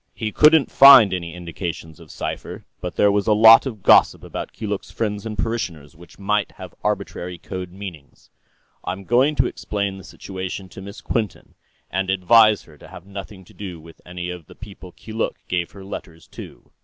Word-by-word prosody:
He 110 -1 -3
couldn't 155 +2 +5
find 135 -8 +8
any 85 -2 -5
indications 85 -2 -7
of - - -15
cipher, - - -6
but - - -6
there 105 - +4
was 100 0 0
a 110 - +5
lot 115 +4 +8
of 110 -7 -8
gossip - - +5
about - - -6
Keeluk's 105 -3 -5
friends 105 -1 -3
and 105 -1 -6
parishioners 85 -10 -4
which 85 +1 -17
might 100 0 -1
have - - -11
arbitrary 90 0 -3
code 90 +1 -7
meanings. 90 -7 -11 0.5
I'm 95 +2 -5
going 130 - +2
to 130 -2 +2
explain 100 -4 -4
the - - -12
situation 95 +1 -7
to 95 - -11
Miss 100 +3 -10
Quinton, 110 -4 -4 0.4
and 95 0 -2
advise 105 +3 +4
her 75 -3 -19
to - - -14
have 90 - -12
nothing 100 -1 -10
to - - -19
do 90 -5 -8
with 80 +1 -16
any 90 0 -6
of 90 -3 -10
the - - -15
people 100 -4 -12
Keeluk 110 +5 -4
gave 90 -1 -2
her 100 - -11
letters 85 -4 -9
to." - - -12
95 Hz, 185 wpm, -21 LUFS, 90-110 Hz, 0.5 s, find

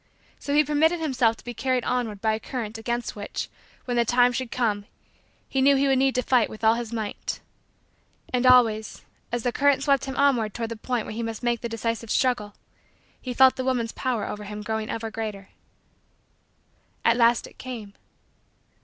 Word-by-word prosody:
So 285 - -2
he 300 - +6
permitted 315 +4 +2
himself 250 -7 +1
to - - -16
be 240 - -5
carried 255 +1 0
onward 225 -5 -2
by 220 -1 +2
a 220 - -2
current 225 -2 -5
against 240 +1 -3
which, 205 -1 -5 0.4
when 245 -1 -1
the 235 - +4
time 245 +1 +3
should 255 0 -3
come, 210 -5 -1 0.6
he 270 - 0
knew 280 +1 +6
he 275 +1 +2
would 265 -1 +3
need 270 0 +2
to 250 - +1
fight 245 -3 +3
with 215 - -11
all 220 0 +6
his 235 -1 -4
might. 220 -3 -4 0.9
And 250 0 +2
always, 225 -4 +4 0.3
as 240 -1 -2
the 245 - +1
current 280 +1 +3
swept 275 -2 +2
him 265 -1 -5
onward 250 -7 +2
toward 230 -1 -3
the 230 - -4
point 235 0 -2
where - - -6
he 230 - -4
must 225 0 -5
make 240 -1 0
the 235 - -3
decisive 230 0 -3
struggle, 245 -6 0 0.7
he 255 - -5
felt 260 +1 +5
the 260 - -2
woman's 245 -3 0
power 245 -5 -2
over 210 0 -6
him 210 +1 -6
growing 220 0 -3
ever 225 -1 -4
greater. 215 -3 -5 1.6
At 230 - +5
last 235 0 +3
it - - -15
came. 230 -6 -7
240 Hz, 195 wpm, -25 LUFS, 220-255 Hz, 1.6 s, he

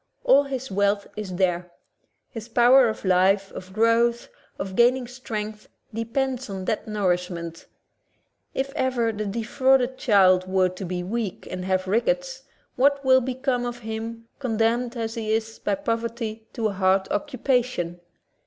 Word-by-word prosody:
All 285 - +5
his 265 -1 -5
wealth 200 +1 +1
is 200 -4 -5
there; 180 -1 0 0.6
his 225 -2 -7
power 245 +2 +6
of 220 - -6
life, 190 +2 +3
of 185 0 -9
growth, 230 +3 +2 0.3
of 190 -1 -5
gaining 245 +3 +4
strength 215 -4 -6 0.3
depends 250 +2 -2
on 190 -1 -5
that 220 +1 -2
nourishment. 180 -5 -2 0.9
If 275 +1 -2
ever 250 -5 +1
the 215 -1 -4
defrauded 255 +4 +1
child 185 -4 +4
were 185 -1 +2
to 185 +1 -7
be 180 0 -3
weak 210 +1 -4
and 185 0 -4
have 185 0 0
rickets, 265 +5 0 0.3
what 280 +2 +2
will 260 0 +6
become 255 0 -1
of 240 0 -5
him, 225 +1 -5
condemned 235 0 0
as 225 -1 -3
he 220 -2 -3
is 225 0 -2
by - - 0
poverty 230 -4 -3
to 225 -3 0
a - - -4
hard 190 0 +2
occupation? 250 - -1
225 Hz, 145 wpm, -24 LUFS, 195-250 Hz, 0.9 s, power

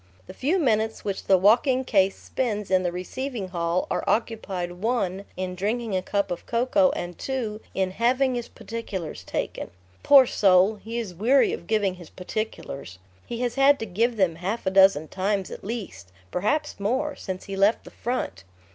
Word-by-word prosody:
The - - -10
few 305 +9 0
minutes 220 - 0
which 200 -2 -3
the 190 - +5
walking 245 +7 +4
case 195 -5 +2
spends 210 -6 -3
in 185 -1 +4
the 175 -1 -1
receiving 205 +4 -5
hall 170 0 0
are - - 0
occupied 195 -6 -1
(1) 195 0 -1
in 185 0 -3
drinking 215 +3 -2
a 185 - +1
cup 200 +1 -1
of 175 - -5
cocoa, 255 +4 +3
and 175 0 -5
(2) 230 -5 -3
in 190 -1 0
"having 250 +5 +2
his 240 -1 -3
particulars 200 -8 -6
taken." - - -4 0.3
Poor 275 -2 +8
soul! 195 -1 +4
he 225 +3 -6
is 220 -6 -4
weary 245 +9 +3
of 170 - -7
giving 210 -3 +1
his 175 -3 -12
"particulars." 180 - -5 0.3
He 235 0 -4
has 245 -1 0
had 275 +2 +5
to 225 - -4
give 230 +4 0
them 180 -5 +2
half 195 +7 -3
a 190 - +1
dozen 190 -5 +5
times 195 +1 -1
at - - -8
least, 200 - -6 0.2
perhaps 295 +12 -1
more, 260 +9 -1
since 185 -2 -6
he 195 - -6
left 200 +3 +3
the - - -12
front. 225 - -3
210 Hz, 180 wpm, -25 LUFS, 185-240 Hz, 0.3 s, Poor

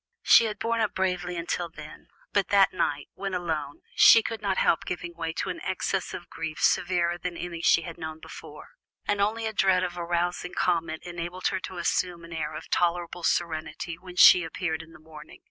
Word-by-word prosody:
She 230 - +7
had 215 -2 -3
borne 230 +2 -1
up 215 - -1
bravely 180 -1 -1
until 170 0 -3
then, 155 -2 -12 0.3
but 200 -2 +2
that 200 -2 +4
night, 145 -5 -1
when 195 -1 -4
alone, 155 -5 -3
she 225 - +8
could 225 -2 -4
not 195 -2 -1
help 165 - +2
giving 175 -1 -5
way 165 -1 -4
to - - -2
an - - -7
access 190 0 -2
of 175 - -9
grief 160 -1 -6
severer 175 -1 +1
than 175 -1 -5
any 170 -2 -5
she 165 - +4
had 170 0 -8
known 160 -1 -6
before, - - -11 0.4
and 205 -1 0
only 220 +3 0
a 220 - -2
dread 190 -2 +3
of 175 -1 -4
arousing 175 +1 -2
comment 165 -2 0
enabled 175 +1 -3
her 190 - -2
to 185 0 -8
assume 175 0 -1
an 170 - -10
air 155 -2 -4
of - - -8
tolerable 175 0 0
serenity 165 0 -2
when 180 0 -11
she 180 0 +8
appeared 165 -1 -3
in 165 0 -15
the - - -15
morning. 155 0 -13
175 Hz, 200 wpm, -27 LUFS, 165-185 Hz, 0.4 s, she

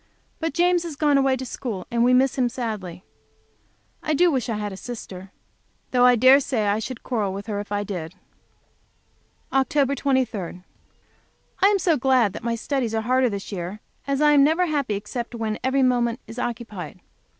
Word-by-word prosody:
But 325 -3 -3
James 350 0 +3
has 335 -3 -6
gone 290 -1 +3
away 270 -1 +3
to 260 - -6
school, 220 -7 -5
and 235 0 +2
we 245 - +4
miss 260 +1 +3
him 250 -2 +1
sadly. 210 -8 -5 1.0
I 310 - -1
wish 280 -7 +2
I 225 - -1
had 205 -1 -4
a - - -6
sister. 190 -4 -8 0.6
Though 250 -1 +5
I 250 - +6
dare 255 +4 +7
say 255 -6 -1
I 205 +1 +1
should 240 +2 -6
quarrel 210 -6 -1
with 200 +1 -6
her, 210 -2 -3
if 205 0 -7
I 205 0 -1
had. 175 -3 -5 1.4
Oct 275 +1 +2
23. 225 -10 -1 1.0
I 390 - +7
am 410 0 +3
so 340 -4 +2
glad 255 -6 +3
that - - -7
my 235 0 -1
studies 235 -1 -2
are 220 - 0
harder 255 +1 +2
this 200 -1 -6
year, 185 +2 -5 0.3
as 275 +1 0
I 300 - +6
am 285 -2 +6
never 320 +5 +3
happy 285 -9 -1
except 235 +4 -5
when 220 -2 -3
every 265 +1 +2
moment 245 -1 +1
is 230 - -9
occupied. 225 -9 -5
245 Hz, 185 wpm, -23 LUFS, 210-270 Hz, 1.4 s, dare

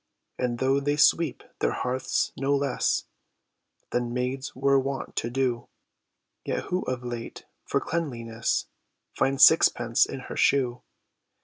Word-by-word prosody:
And 120 -1 -1
though 135 +2 +2
they 145 +1 0
sweep 150 0 +3 0.2
their - - +1
hearths 130 +1 -1
no 140 +2 +1
less 140 -1 0 0.9
Than 120 -1 -1
maids 125 +2 -3
were 135 +1 +3
wont 135 0 -4
to 115 - -1
do, 125 -1 -1 0.8
Yet - - -2
who 180 +1 +1
of 125 -1 -3
late, 120 -1 -6 0.2
for - - +1
cleanliness, 115 -9 -2 0.5
Finds 135 +1 +5
sixpence 120 -7 +4
in 135 - -6
her - - -8
shoe? 125 -3 +2
130 Hz, 130 wpm, -26 LUFS, 120-140 Hz, 0.9 s, Finds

